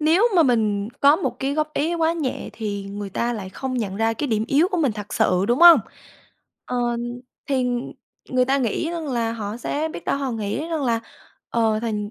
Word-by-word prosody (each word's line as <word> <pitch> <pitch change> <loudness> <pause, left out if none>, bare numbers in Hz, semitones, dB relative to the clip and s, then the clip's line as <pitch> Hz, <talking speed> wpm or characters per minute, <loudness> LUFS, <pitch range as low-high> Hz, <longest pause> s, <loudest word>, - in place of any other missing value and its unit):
nếu 340 +10 +4
mà 335 - +7
mình 215 -6 +1
có 285 +2 +6
một 380 - -2
cái 275 +1 -1
góp 305 0 -1
ý 325 +4 0
quá 330 0 +2
nhẹ 300 -7 -3
thì 205 -3 -4
người 200 -1 -6
ta 235 +4 -1
lại 200 -5 -5
không 260 +6 -4
nhận 195 -4 -3
ra 225 +1 +1
cái 290 - -2
điểm 220 -4 0
yếu 310 +6 +3
của 365 - 0
mình 275 -8 +2
thật 205 -1 -7
sự, 185 +1 +2
đúng 240 +4 +2
hông? 340 -7 +10 0.9
Ờ, 240 -1 -1 0.5
thì 265 -3 +1 0.6
người 255 -1 +2
ta 270 +2 +1
nghĩ 265 +6 -1
rằng 335 -3 -4
là 230 -3 -1
họ 215 -1 -5
sẽ 295 +6 -2
biết - - -8
đâu - - 0
họ 270 -2 -2
nghĩ 225 +9 -3
rằng 320 -3 -2
là, 230 -2 +1 0.5
ờ, 225 -2 +2
thành 210 -3 -3
245 Hz, 215 wpm, -23 LUFS, 215-300 Hz, 0.9 s, hông